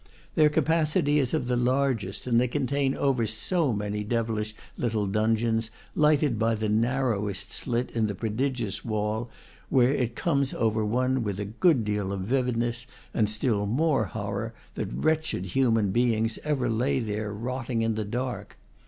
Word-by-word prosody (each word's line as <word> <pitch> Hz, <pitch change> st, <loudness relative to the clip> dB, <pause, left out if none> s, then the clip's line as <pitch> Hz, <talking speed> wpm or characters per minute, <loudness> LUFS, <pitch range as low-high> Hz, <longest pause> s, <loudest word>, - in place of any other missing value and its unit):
Their 155 Hz, -1 st, +5 dB
capacity 150 Hz, -1 st, +2 dB
is 130 Hz, -4 st, 0 dB
of 155 Hz, -5 st, 0 dB
the 125 Hz, 0 st, 0 dB
largest, 125 Hz, -5 st, 0 dB
and 120 Hz, -1 st, +3 dB
they 125 Hz, -, +2 dB
contain 135 Hz, +1 st, 0 dB
over 130 Hz, -5 st, +1 dB
so 145 Hz, -, +1 dB
many 105 Hz, 0 st, -2 dB
devilish 110 Hz, -1 st, -2 dB, 0.2 s
little 110 Hz, -3 st, 0 dB
dungeons, 110 Hz, +2 st, +1 dB, 0.2 s
lighted 150 Hz, -6 st, +3 dB
by 115 Hz, 0 st, +2 dB
the 110 Hz, 0 st, -2 dB
narrowest 105 Hz, -4 st, 0 dB
slit 120 Hz, -1 st, -1 dB
in 110 Hz, -2 st, +1 dB
the 100 Hz, -, -3 dB
pro 110 Hz, +2 st, -3 dB
digious 120 Hz, -4 st, -2 dB
wall, 110 Hz, +1 st, -2 dB, 0.4 s
where 125 Hz, -1 st, +4 dB
it 125 Hz, -4 st, -1 dB
comes 140 Hz, -5 st, 0 dB
over 110 Hz, -1 st, +1 dB
one 125 Hz, +3 st, +1 dB
with 100 Hz, -2 st, -3 dB
a 105 Hz, -, -2 dB
good 120 Hz, -, +2 dB
deal 105 Hz, -2 st, -1 dB
of 100 Hz, -1 st, -3 dB
vividness 120 Hz, +1 st, -1 dB, 0.3 s
and 105 Hz, -2 st, +2 dB
still 110 Hz, -1 st, 0 dB
more 135 Hz, 0 st, +2 dB
horror 105 Hz, +2 st, -4 dB, 0.2 s
that -, -, -3 dB
wretched 155 Hz, -, 0 dB
human 115 Hz, -1 st, +2 dB
beings 115 Hz, 0 st, +1 dB
ever 145 Hz, -4 st, 0 dB
lay 130 Hz, +5 st, +1 dB
there 105 Hz, -2 st, -3 dB
rotting 120 Hz, +2 st, -2 dB
in 115 Hz, 0 st, +1 dB
the 110 Hz, 0 st, -2 dB
dark. 120 Hz, +4 st, -4 dB
115 Hz, 160 wpm, -27 LUFS, 105-130 Hz, 0.4 s, Their